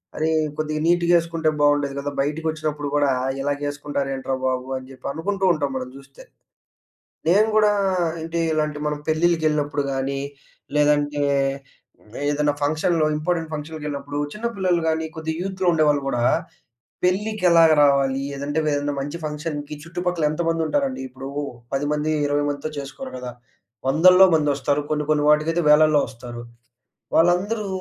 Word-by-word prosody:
అరే! 155 Hz, +1 st, 0 dB, 0.3 s
కొద్దిగా 155 Hz, 0 st, -2 dB
నీట్‍గా 175 Hz, 0 st, +3 dB
ఏసుకుంటే 165 Hz, -1 st, -1 dB
బాగుండేది 145 Hz, -1 st, +2 dB
కదా! 145 Hz, +1 st, -3 dB
బయటికొచ్చినప్పుడు 150 Hz, 0 st, -2 dB
గూడా 145 Hz, -2 st, +3 dB, 0.3 s
ఇలాగేసుకుంటారేంట్రా 140 Hz, -1 st, -2 dB
బాబు! 130 Hz, 0 st, -2 dB
అని 130 Hz, -, -13 dB
చెప్పి 130 Hz, -, -15 dB
అనుకుంటూ 195 Hz, +5 st, -2 dB
ఉంటాం 145 Hz, -3 st, -2 dB
మనం 125 Hz, -1 st, -5 dB
చూస్తే. 135 Hz, 0 st, -15 dB, 1.0 s
నేను 205 Hz, +6 st, +5 dB
కూడా 210 Hz, -1 st, +5 dB, 0.5 s
అంటే, 165 Hz, +1 st, -3 dB
ఇలాంటి 150 Hz, -1 st, -1 dB
మనం 150 Hz, 0 st, -2 dB
పెళ్ళిళ్ళకెళ్ళినప్పుడు 155 Hz, -3 st, +1 dB
గాని, 135 Hz, +1 st, -2 dB, 0.6 s
లేదంటే 145 Hz, 0 st, +2 dB, 1.1 s
ఏదైనా 145 Hz, 0 st, +1 dB
ఫంక్షన్‌లో, 155 Hz, +2 st, +1 dB
ఇంపార్టెంట్ 165 Hz, +1 st, -1 dB
ఫంక్షన్‌కెళ్ళినప్పుడు, 150 Hz, -2 st, -5 dB
చిన్న 220 Hz, +2 st, -6 dB
పిల్లలు 180 Hz, -3 st, +1 dB
గాని 160 Hz, 0 st, -1 dB
కొద్దిగా 160 Hz, 0 st, -4 dB
యూత్‌లో 190 Hz, -1 st, -2 dB
ఉండేవాళ్ళు 150 Hz, -3 st, +2 dB
గూడా, 120 Hz, -3 st, -1 dB, 0.8 s
పెళ్ళికి 205 Hz, +2 st, 0 dB
ఎలాగ 165 Hz, -1 st, +6 dB
రావాలి, 135 Hz, -1 st, +2 dB, 0.2 s
ఏదంటే 145 Hz, +2 st, -3 dB, 0.2 s
ఏదైనా 145 Hz, 0 st, -1 dB
మంచి 145 Hz, +5 st, -5 dB
ఫంక్షన్‌కి 150 Hz, -1 st, -5 dB
చుట్టుపక్కల 175 Hz, -1 st, -2 dB
ఎంతమంది 165 Hz, +1 st, -1 dB
ఉంటారండి, 275 Hz, -, -1 dB
ఇప్పుడు 130 Hz, +1 st, -8 dB, 0.5 s
10 145 Hz, +2 st, -1 dB
మంది, 150 Hz, +1 st, -1 dB, 0.2 s
20 145 Hz, 0 st, +1 dB
మందితో 145 Hz, +2 st, -4 dB
చేసుకోరు 135 Hz, -2 st, -7 dB
కదా! 125 Hz, -1 st, -6 dB, 0.6 s
వందల్లో 180 Hz, +6 st, +7 dB
మంది 150 Hz, -2 st, +1 dB
వస్తారు. 145 Hz, +1 st, 0 dB
కొన్ని, 150 Hz, -1 st, -1 dB
కొన్ని 150 Hz, -1 st, +1 dB
వాటికైతే 160 Hz, +3 st, +2 dB
వేలల్లో 150 Hz, -1 st, +5 dB
వస్తారు. 120 Hz, -1 st, -9 dB, 0.7 s
వాళ్ళందరూ 195 Hz, +6 st, +2 dB
150 Hz, 130 wpm, -22 LUFS, 145-165 Hz, 1.1 s, వందల్లో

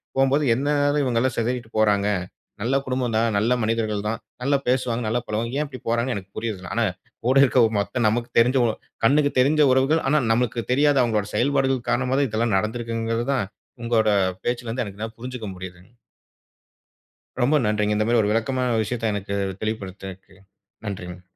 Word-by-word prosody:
போகும்போது, 135 Hz, +2 st, +3 dB
எதுனால 145 Hz, +3 st, +1 dB
இவங்கலாம் 125 Hz, 0 st, 0 dB
சிதறிட்டு 115 Hz, 0 st, -2 dB
போறாங்க, 105 Hz, -2 st, +3 dB, 0.6 s
நல்ல 125 Hz, +4 st, 0 dB
குடும்பம் 125 Hz, -3 st, -1 dB
தான், 115 Hz, +1 st, +2 dB
நல்ல 110 Hz, +4 st, +2 dB
மனிதர்கள் 110 Hz, -2 st, -1 dB
தான், 115 Hz, -, -3 dB, 0.2 s
நல்ல 140 Hz, +3 st, +1 dB
பேசுவாங்க, 125 Hz, -2 st, 0 dB
நல்ல 120 Hz, +3 st, 0 dB
பழகுவாங்க. 115 Hz, +5 st, -2 dB
ஏன் 150 Hz, -, -1 dB
இப்டி 130 Hz, -2 st, -9 dB
போறாங்கன்னு 120 Hz, +1 st, 0 dB
எனக்கு 100 Hz, 0 st, -9 dB
புரியல. 100 Hz, -6 st, -4 dB
ஆனா, 115 Hz, -, +2 dB, 0.4 s
கூட 130 Hz, +2 st, +3 dB
இருக்ற 130 Hz, -1 st, +3 dB, 0.2 s
மொத்த 120 Hz, +4 st, -1 dB
நமக்கு 120 Hz, +2 st, -1 dB
தெரிஞ்ச 125 Hz, +3 st, +3 dB, 0.5 s
கண்ணுக்கு 145 Hz, +3 st, +3 dB
தெரிஞ்ச 150 Hz, +4 st, +3 dB
உறவுகள் 135 Hz, +5 st, +2 dB
ஆனா, 150 Hz, +3 st, +3 dB
நமக்கு 115 Hz, 0 st, 0 dB
தெரியாத 145 Hz, +2 st, +3 dB
அவங்களோட 110 Hz, -4 st, 0 dB
செயல்பாடுகள் 135 Hz, -1 st, +1 dB
காரணமாதான் 130 Hz, +2 st, +1 dB
இதெல்லாம் 110 Hz, 0 st, 0 dB
நடந்திருக்குங்கறத 115 Hz, +2 st, -2 dB
தான், 130 Hz, -, 0 dB, 0.4 s
உங்களோட 115 Hz, -2 st, +2 dB, 0.4 s
பேச்சுலருந்து 120 Hz, 0 st, -2 dB
என்னால 110 Hz, +2 st, -7 dB
புரிஞ்சுக்க 125 Hz, -2 st, -6 dB
முடியுதுங்க. 90 Hz, +2 st, -11 dB, 1.5 s
ரொம்ப 130 Hz, +5 st, +3 dB
நன்றிங்க, 105 Hz, 0 st, +1 dB
இந்த 105 Hz, -, +1 dB
மாரி 120 Hz, 0 st, +3 dB
ஒரு 105 Hz, 0 st, 0 dB
விளக்கமான 120 Hz, +2 st, 0 dB
விஷயத்த 115 Hz, 0 st, -2 dB
எனக்கு 100 Hz, 0 st, -3 dB, 0.3 s
தெளிவுபடுத்துனதுக்கு, 95 Hz, -3 st, -6 dB, 0.5 s
நன்றிங்க. 90 Hz, -3 st, -6 dB
115 Hz, 150 wpm, -23 LUFS, 110-130 Hz, 1.5 s, போகும்போது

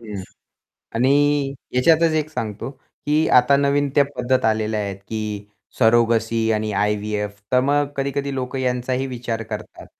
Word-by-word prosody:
हं. 105 Hz, -4 st, -7 dB, 0.7 s
आणि 140 Hz, +3 st, +2 dB, 0.2 s
ह्याच्यातच 160 Hz, +6 st, +4 dB
एक 155 Hz, -1 st, 0 dB
सांगतो, 115 Hz, -3 st, -4 dB
की 150 Hz, +3 st, -2 dB
आता 125 Hz, +3 st, +4 dB
नवीन 140 Hz, 0 st, +2 dB
त्या 145 Hz, -, +5 dB
पद्धत 130 Hz, +1 st, +1 dB
आलेल्या 110 Hz, -1 st, +1 dB
आहेत, 100 Hz, -2 st, -4 dB
की 105 Hz, -2 st, -4 dB, 0.3 s
सरोगसी 115 Hz, -1 st, +3 dB
आणि 110 Hz, 0 st, -1 dB
आय-व्ही-एफ. 105 Hz, 0 st, -1 dB
तर 125 Hz, -, +5 dB
मग 145 Hz, +1 st, +1 dB
कधी-कधी 140 Hz, 0 st, -2 dB
लोक 130 Hz, 0 st, -4 dB
यांचाही 125 Hz, 0 st, -1 dB
विचार 120 Hz, -3 st, -4 dB
करतात. 110 Hz, -1 st, -8 dB
125 Hz, 140 wpm, -21 LUFS, 110-140 Hz, 0.7 s, त्या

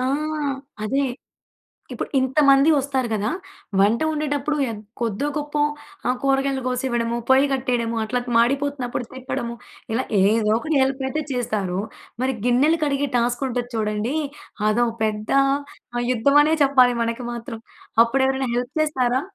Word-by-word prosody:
ఆ! -, -, 0 dB, 0.8 s
అదే. 270 Hz, +6 st, +1 dB, 0.9 s
ఇప్పుడు -, -, -4 dB
ఇంతమంది 275 Hz, +2 st, +4 dB
వస్తారు 270 Hz, -3 st, 0 dB
గదా! 215 Hz, +1 st, 0 dB, 0.5 s
వంట 210 Hz, +4 st, +4 dB
ఒండేటప్పుడు 300 Hz, -1 st, -1 dB
యగ్ 225 Hz, -3 st, -5 dB, 0.2 s
కొద్దోగొప్పో 290 Hz, +6 st, -1 dB, 0.5 s
ఆహ్, 250 Hz, -, +1 dB
కూరగాయలు 270 Hz, -1 st, +1 dB
గోసివ్వడము, 240 Hz, -2 st, -1 dB
పొయ్యి 265 Hz, +2 st, +6 dB
కట్టెయడము, 240 Hz, -3 st, -1 dB
అట్లా 245 Hz, +3 st, -1 dB
త్ -, -, -5 dB
మాడిపోతున్నప్పుడు 260 Hz, +1 st, +1 dB
తిప్పడము, 245 Hz, -2 st, -4 dB, 0.4 s
ఇలా 255 Hz, +3 st, 0 dB, 0.2 s
ఏదో 210 Hz, +2 st, +3 dB
ఒకటి 305 Hz, +4 st, -1 dB
హెల్పయితే 265 Hz, +3 st, -1 dB
చేస్తారు. 210 Hz, -7 st, -1 dB, 0.4 s
మరి 260 Hz, 0 st, +1 dB
గిన్నెలు 280 Hz, +7 st, +3 dB
కడిగే 285 Hz, 0 st, 0 dB
టాస్కుంటది 245 Hz, 0 st, -1 dB
చూడండీ, 215 Hz, +4 st, -1 dB, 0.5 s
అదో 240 Hz, +3 st, +3 dB, 0.2 s
పెద్ద 215 Hz, -1 st, -1 dB, 0.7 s
ఆహ్, 240 Hz, -, 0 dB
యుద్ధమనే 285 Hz, +6 st, +4 dB
చెప్పాలి 255 Hz, -3 st, +5 dB
మనకి 230 Hz, +2 st, -2 dB
మాత్రం. 230 Hz, -1 st, -7 dB, 0.4 s
అప్పుడెవరైనా 265 Hz, +1 st, 0 dB
హెల్ప్ 245 Hz, +3 st, -3 dB
చేస్తారా? 260 Hz, -4 st, +1 dB
255 Hz, 120 wpm, -22 LUFS, 235-275 Hz, 0.9 s, పొయ్యి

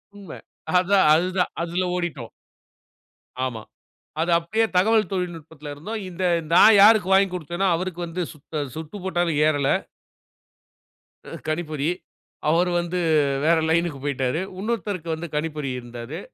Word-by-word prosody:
உண்ம. 200 Hz, -1 st, -11 dB, 0.5 s
அதா, 190 Hz, +3 st, +2 dB, 0.2 s
அதுதா 180 Hz, +3 st, +2 dB, 0.2 s
அதுல 170 Hz, +2 st, -1 dB
ஓடிட்டோம். 175 Hz, -2 st, -4 dB, 1.2 s
ஆமா. 115 Hz, -4 st, -5 dB, 0.6 s
அது 170 Hz, +2 st, 0 dB
அப்டியே 195 Hz, +7 st, 0 dB
தகவல் 215 Hz, +4 st, +3 dB
தொழில்நுட்பத்துல 165 Hz, -5 st, -5 dB
இருந்தோம். 210 Hz, +10 st, -6 dB
இந்த 185 Hz, +1 st, -4 dB, 0.3 s
நான் 215 Hz, +4 st, +8 dB
யாருக்கு 210 Hz, -2 st, +6 dB
வாங்கிக் 190 Hz, -1 st, +4 dB
குடுத்தனோ 175 Hz, +3 st, -2 dB
அவருக்கு 180 Hz, 0 st, -4 dB
வந்து 170 Hz, +2 st, -4 dB
சுத்த 150 Hz, -1 st, -5 dB
சுட்டு 160 Hz, +4 st, -7 dB
போட்டாலும் 175 Hz, -4 st, 0 dB
ஏறல. 145 Hz, -3 st, +1 dB, 1.6 s
அ -, -, -11 dB, 0.2 s
கணிப்பொறி. 155 Hz, -2 st, -2 dB, 0.6 s
அவர் 175 Hz, +3 st, +3 dB
வந்து 175 Hz, +1 st, -2 dB, 0.5 s
வேற 165 Hz, +1 st, +4 dB
லைனுக்கு 165 Hz, -3 st, +1 dB
போய்ட்டாரு. 135 Hz, 0 st, -1 dB, 0.2 s
இன்னொருத்தருக்கு 205 Hz, -5 st, -3 dB
வந்து 165 Hz, +2 st, -6 dB
கணிப்பொறி 150 Hz, -2 st, -2 dB
இருந்தாரு. 120 Hz, +5 st, -8 dB
170 Hz, 120 wpm, -23 LUFS, 155-185 Hz, 1.6 s, நான்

